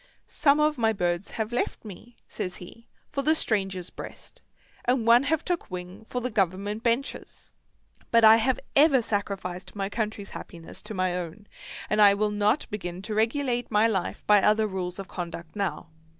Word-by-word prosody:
"Some 285 -1 +2
of 300 -2 +2
my 225 -1 +3
birds 175 -1 -1
have 220 0 -2
left 245 - -2
me," 220 +4 -11
says 180 - -5
he, 230 +6 -12 0.2
"for 275 - -3
the 310 +3 +3
stranger's 195 - -1
breast, - - -10 0.4
and 245 -2 +1
one 235 +1 +7
have 290 +3 0
took 355 -1 -2
wing 180 +3 -7
for 250 +2 -4
the 250 +1 -3
Government 200 +1 -1
benches. 240 +4 -2 0.6
But 230 -1 +4
I 220 +1 +9
have 245 +3 +1 0.2
ever 275 -4 +5
sacrificed 195 -4 -3
my 195 -1 -2
country's 210 -2 -3
happiness 165 -1 -9
to 215 - -6
my 185 -1 0
own, 180 +3 -6 0.4
and 210 0 +2
I 200 -1 +7
will 210 +1 0
not 210 +6 +1
begin 185 -3 -5
to 215 - -4
regulate 240 +2 0
my 215 +1 +4
life 190 -6 -2
by 210 -1 +6
other 215 +2 +3
rules 185 -3 -4
of 195 -1 -7
conduct 170 -2 -7
now. 185 -6 -3
210 Hz, 180 wpm, -26 LUFS, 185-235 Hz, 0.6 s, I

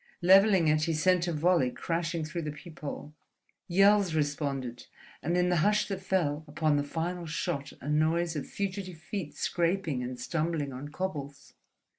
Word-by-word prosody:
Levelling 190 -1 +6
it 155 0 +3
he 165 - 0
sent 180 +2 +2
a - - 0
volley 160 -4 +3
crashing 165 +3 -2
through 170 +3 -4
the 150 -1 -3
peephole. 150 -1 -8 0.5
Yells 195 -1 +4
responded, 140 -5 -2 0.3
and 170 +3 0
in 180 0 +3
the 175 - +2
hush 210 +6 +3
that 195 -1 -3
fell 160 -6 0
upon 150 0 +1
the 145 - +1
final 170 +4 -3
shot 140 -2 -3
a 135 - -8
noise 160 +3 +1
of 145 - -4
fugitive 190 -3 -4
feet 175 -1 -6
scraping 170 -6 0
and 125 0 -5
stumbling 155 0 -2
on 130 +3 -6
cobbles. 145 -4 -5
160 Hz, 160 wpm, -29 LUFS, 145-180 Hz, 0.5 s, Levelling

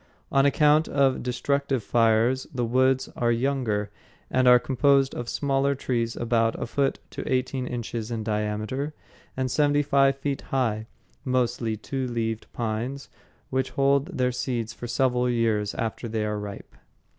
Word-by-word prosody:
On 135 +1 +4
account 150 +2 +4
of 135 -2 +2
destructive 130 +1 -1
fires 115 +4 +2
the 125 -4 -1
woods 130 +2 +2
are 120 -1 +1
younger 115 -5 0 0.4
and 130 0 +3
are 125 0 +9
composed 135 +2 +2
of 120 -1 -5
smaller 140 0 +1
trees 120 -3 -1
about 115 -1 +1
a - - -2
foot 135 +3 0
to - - -5
eighteen 130 0 -1
inches 115 -2 -4
in 115 -2 -3
diameter 110 +7 -2 0.4
and 130 -1 -1
seventy 145 +1 +3
five 135 -1 +3
feet 140 0 -2
high, 115 -5 0 0.4
mostly 120 -4 0
two 130 +4 -3
leaved 115 -2 -3
pines 120 +4 -3 0.4
which 130 0 0
hold 140 +5 +2
their 125 0 +2
seeds 120 -2 -3
for 120 - -7
several 125 0 +1
years 110 -4 0
after 115 +1 -3
they 110 -1 -2
are 105 0 -2
ripe. 100 -1 -8
125 Hz, 150 wpm, -26 LUFS, 115-135 Hz, 0.4 s, are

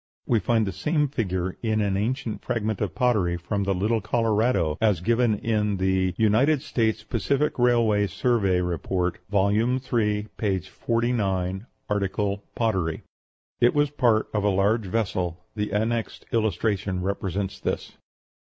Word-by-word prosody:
We 115 - +2
find 110 +2 +1
the 95 - -2
same 150 - 0
figure 95 -8 -2
in 110 -2 0
an 100 -2 +1
ancient 115 +3 -2
fragment 110 -2 -2
of 100 -5 -2
pottery 105 -9 +2
from 100 +3 -2
the 100 0 +1
Little 110 +4 +1
Colorado, 105 -7 +1
as 105 -6 +3
given 115 +3 +2
in 105 -2 0
the 95 -1 +1
"United 130 +7 +3
States 110 -6 0
Pacific 135 +7 0
Railroad 115 -5 +3
Survey 100 -7 +1
Report," 90 +1 -1
vol. 100 -1 +2
iii., 110 -2 0
p. 100 -3 0
49, 100 -2 -1 0.2
art. 100 -2 -1 0.4
Pottery. 95 -9 -1 0.6
It 120 +3 +4
was 145 -1 +2
part 115 -6 +2
of 105 -2 0
a 105 - +3
large 100 +2 +1
vessel. 90 -5 -1 0.2
The 105 -1 -2
annexed 110 +3 -1
illustration 100 -3 0
represents 100 0 -2
this. - - -3
105 Hz, 140 wpm, -25 LUFS, 95-115 Hz, 0.6 s, It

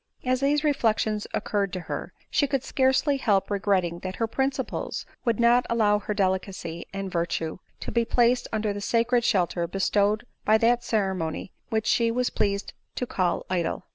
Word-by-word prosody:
As 255 0 +2
these 285 +2 +2
reflections 220 -7 +1
occurred 200 -2 -1
to 185 - -3
her, 165 - -5 0.2
she 285 - +2
could 275 -2 -1
scarcely 265 +2 +2
help 205 -6 +1
regretting 190 -4 +1
that 185 +1 -5
her 230 - 0
principles 265 +2 -2 0.2
would 235 -2 +1
not 240 +1 +5
allow 210 -3 +3
her 210 0 -4
delicacy 185 -3 -2
and 195 -1 -4
virtue 170 -1 -2 0.2
to - - -4
be 235 - +2
placed 245 +1 +2
under 215 -1 0
the 205 - -5
sacred 235 +3 +2
shelter 175 -5 +1
bestowed 205 +3 +1 0.2
by 215 +1 +5
that 240 +2 +3
ceremony 190 -7 -1 0.2
which 220 -2 0
she 230 -1 +3
was 245 +2 0
pleased 200 0 -1 0.2
to 250 - -2
call 185 -7 -1
idle. 180 -2 -1
215 Hz, 170 wpm, -26 LUFS, 190-240 Hz, 0.2 s, not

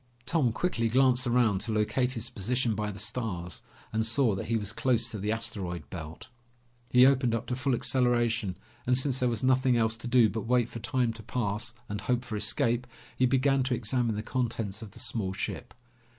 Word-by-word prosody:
Tom 145 -7 +2
quickly 115 -4 0
glanced 130 +1 +3
around 120 -5 +3
to 115 - -2
locate 125 +4 +1
his 120 +1 -6
position 120 +2 0
by 105 0 -2
the 100 - -7
stars 100 -5 -3 0.3
and 110 0 +1
saw 115 +1 +2
that 95 - -4
he 115 - +1
was 105 0 -3
close 120 -1 +1
to 110 - -5
the 105 +2 -1
asteroid 95 -8 -4
belt. 80 -3 -8 0.6
He 125 +1 +7
opened 130 -3 +3
up 115 - -3
to 125 - -2
full 130 0 0
acceleration, 120 -6 +1 0.3
and 125 0 +4
since 130 -1 0
there 125 - +2
was 115 -1 -3
nothing 130 -1 +3
else 110 -1 +1
to 120 - -7
do 120 -2 +5
but 110 0 -4
wait 120 -1 +2
for 115 - -7
time 125 -1 0
to 110 - -10
pass 110 0 -3
and 105 -1 -4
hope 120 +5 0
for 115 -3 -5
escape, 115 +3 +1 0.3
he 130 - +3
began 135 +1 +3
to 130 -1 +1
examine 115 0 0
the 105 - -3
contents 115 -5 -2
of 110 - -8
the 100 - -13
small 110 -6 -2
ship. - - -4
115 Hz, 205 wpm, -29 LUFS, 105-125 Hz, 0.6 s, He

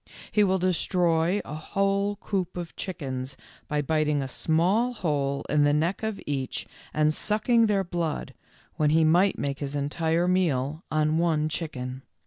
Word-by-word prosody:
He 210 - +4
will 190 -1 +3
destroy 180 0 +1
a 145 - -7
whole 195 +5 0
coop 190 -3 -3
of 175 -2 -6
chickens, 135 -7 -5 0.3
by 150 0 0
biting 150 -1 +1
a - - -4
small 180 - +1
hole 140 - -1
in 150 -1 +3
the 145 0 +4
neck 165 +5 0
of 220 -2 -3
each 135 -3 -2 0.3
and 155 0 +2
© - - -4
sucking 220 +5 +2
their 200 -2 +2
blood, 170 -3 -3 0.4
when 150 -1 +3
he 160 +2 +4
might 175 +5 +4
make 140 0 -3
his 140 0 -4
entire 160 +4 0
meal 155 -4 +1
on 155 +1 +1
one 155 -3 +1
chicken. 130 -5 -4
160 Hz, 160 wpm, -26 LUFS, 145-185 Hz, 0.4 s, He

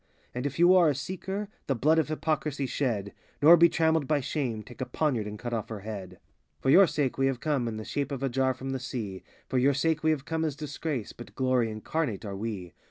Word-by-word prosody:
And 125 +3 -2
if 145 - -6
you 175 +2 +6
are 175 -4 +6
a 145 - 0
seeker, 190 +7 -4 0.2
the 135 - +1
blood 155 +7 +3
of 160 - +1
Hypocrisy 150 -2 -1
shed: 115 -7 -2 0.3
Nor 160 +4 +9
be 170 0 +6
trammeled 160 -3 +2
by 150 -2 +2
Shame—take 125 -4 -4
a - - 0
poniard 125 -5 0
and 105 0 -6
cut 120 +2 -5
off 110 -3 -3
her 110 -3 -6
head. 100 -3 -6
87 90 - -21 0.4
For 130 - 0
your 185 +4 +8
sake 145 -4 -1
we 135 - +3
have 135 -2 -1
come 140 -5 0
In 110 -1 -3
the 110 - -6
shape 145 0 -2
of 135 -1 -4
a - - +2
jar 130 0 +1
from 135 +1 -5
the 135 - -2
Sea; 115 -7 -5 0.3
For 130 - +1
your 135 +2 +3
sake 155 +2 +1
we 160 - +2
have 150 -3 0
come 160 0 -1
as 155 -4 -1
Disgrace. 145 -4 -4
But 120 - -12
glory 130 -3 +2
incarnate 110 +1 -3
are 100 -1 -5
we. 100 -4 -5
135 Hz, 240 wpm, -28 LUFS, 115-155 Hz, 0.4 s, Nor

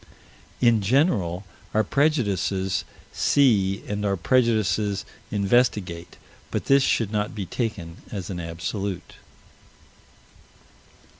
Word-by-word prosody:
In 120 -3 +4
general, 100 - +1 0.3
our 110 - +4
prejudices 100 - 0 0.3
see 100 -9 +3
and 105 0 -3
our 100 -1 +1
prejudices 110 -2 +1 0.2
investigate, 100 -5 0 0.3
but - - -3
this 140 0 +5
should 115 -5 +1
not 105 0 -1
be 100 -3 -3
taken 90 -6 -4
as 95 -2 -5
an 90 - -4
absolute. 90 +2 -5
100 Hz, 95 wpm, -24 LUFS, 95-115 Hz, 0.3 s, this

